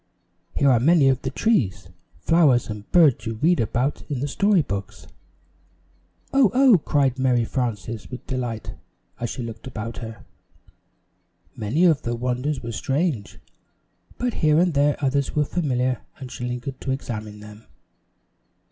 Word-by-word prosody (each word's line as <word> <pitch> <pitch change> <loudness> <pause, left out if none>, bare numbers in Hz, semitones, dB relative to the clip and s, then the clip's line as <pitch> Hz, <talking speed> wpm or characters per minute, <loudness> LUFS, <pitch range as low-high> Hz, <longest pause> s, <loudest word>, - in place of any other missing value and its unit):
"Here 140 -1 +4
are 120 - +4
many 145 +1 +5
of 130 0 +1
the - - -2
trees, 130 - 0 0.3
flowers 125 - +3
and 105 -1 -9
birds 155 -9 +4
you 115 - -3
read 170 +10 +2
about 120 +5 -1
in 140 -4 -2
the 140 - -2
story 200 +3 +2
books." 100 -6 -6 1.3
"Oh! 270 -5 +5
Oh!" 255 -7 +6
cried 135 -3 +1
Mary 125 -3 +2
Frances, 115 -3 -3
with 125 - -8
delight, 120 -4 -4 0.5
as 120 - -2
she 125 - -5
looked 115 +2 -8
about 115 -2 -6
her. 115 -2 -9 1.3
Many 125 - +1
of 160 -6 +4
the 120 0 -2
wonders 125 +4 -2
were 115 - -4
strange, 135 - -2 0.8
but 245 -1 -1
here 155 -1 +2
and 175 0 +3
there 145 +1 +3
others 140 +1 0
were 150 -1 +2
familiar 130 -6 -1 0.2
and 130 -2 -9
she 120 - -5
lingered 125 +2 -5
to - - -5
examine 110 -5 -5
them. 105 +1 -13
130 Hz, 150 wpm, -23 LUFS, 115-150 Hz, 1.3 s, Oh